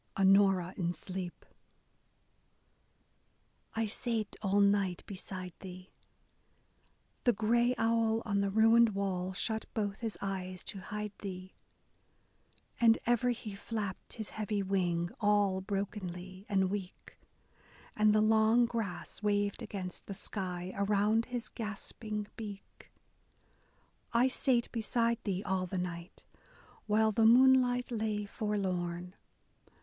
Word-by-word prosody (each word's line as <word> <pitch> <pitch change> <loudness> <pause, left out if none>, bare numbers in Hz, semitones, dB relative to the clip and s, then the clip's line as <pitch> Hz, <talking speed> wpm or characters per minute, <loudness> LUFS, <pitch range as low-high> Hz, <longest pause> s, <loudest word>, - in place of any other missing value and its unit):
Onora 195 -2 +4
in 175 -1 0
sleep: 180 +1 -6 2.3
I 225 0 +1
sate 220 -1 -2
all 200 -1 +2
night 200 -3 +2
beside 185 -2 -7
thee 185 0 -10 0.6
— - - -40
The 245 - +5
gray 235 +4 +2
owl 225 0 +2
on 200 -3 +1
the 200 - +1
ruined 225 +1 +5
wall 190 -2 -1
shut 220 +3 -1
both 205 -2 -1
his 225 -2 -3
eyes 185 -2 -4
to 195 - -5
hide 210 +2 -5
thee, 185 -1 -7 1.3
And 230 -2 +6
ever 240 +1 +2
he 230 -3 -3
flapped 200 -1 -5
his 220 -2 -6
heavy 210 -1 -2
wing, 175 -3 0
all 205 -3 +2
brokenly 190 -1 -5
and 190 -2 +2
weak, 195 -2 -6 0.8
And 215 0 +4
the 215 0 +4
long 220 +2 +5
grass 225 -7 -4
waved 205 -1 0
against 185 -3 -6
the 195 - -5
sky, 185 -2 -4
around 210 +3 +2
his 245 -3 -4
gasping 215 -1 -5
beak! 205 -3 -9 1.2
I 240 +3 +4
sate 250 -2 +1
beside 230 0 +1
thee 195 -1 -1
all 190 -2 -1
the 185 - -4
night, 175 -1 -5 0.6
while 220 +1 +3
the 220 +1 +4
moonlight 250 0 +5
lay 215 -2 -1
forlorn. 180 -4 -2
205 Hz, 120 wpm, -32 LUFS, 190-225 Hz, 2.3 s, And